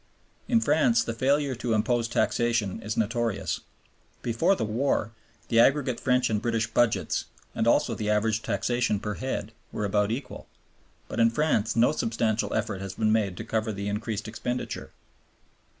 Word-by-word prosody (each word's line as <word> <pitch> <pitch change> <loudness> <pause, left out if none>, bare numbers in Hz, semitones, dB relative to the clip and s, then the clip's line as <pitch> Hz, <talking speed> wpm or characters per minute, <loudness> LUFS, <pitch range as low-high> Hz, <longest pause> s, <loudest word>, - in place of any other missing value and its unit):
In 235 - +4
France 235 0 +3
the 115 - -3
failure 140 +3 +1
to 120 -1 -2
impose 115 +1 +1
taxation 115 -3 0
is 110 0 -4
notorious. 115 -2 -1 0.6
Before 160 +12 +2
the 110 - -2
war 115 0 0 0.4
the 115 - +4
aggregate 130 0 +3
French 125 -1 +2
and 105 -2 0
British 115 -1 0
budgets, 115 0 +1 0.3
and 110 - 0
also 125 0 +3
the 105 -1 -3
average 105 +1 +1
taxation 115 +1 0
per 105 +1 -3
head, 110 -3 -4 0.2
were 105 - -2
about 105 0 +1
equal; 120 +5 -5 0.6
but - - -5
in 115 0 +6
France 115 -4 +1
no 115 +1 +4
substantial 115 -5 0
effort 105 -3 -2
has 95 -1 -6
been 110 -1 +1
made 105 -5 +1
to - - -5
cover 110 0 -1
the 100 0 -4
increased 105 +1 -3
expenditure. 120 +3 -4
115 Hz, 160 wpm, -27 LUFS, 105-120 Hz, 0.6 s, in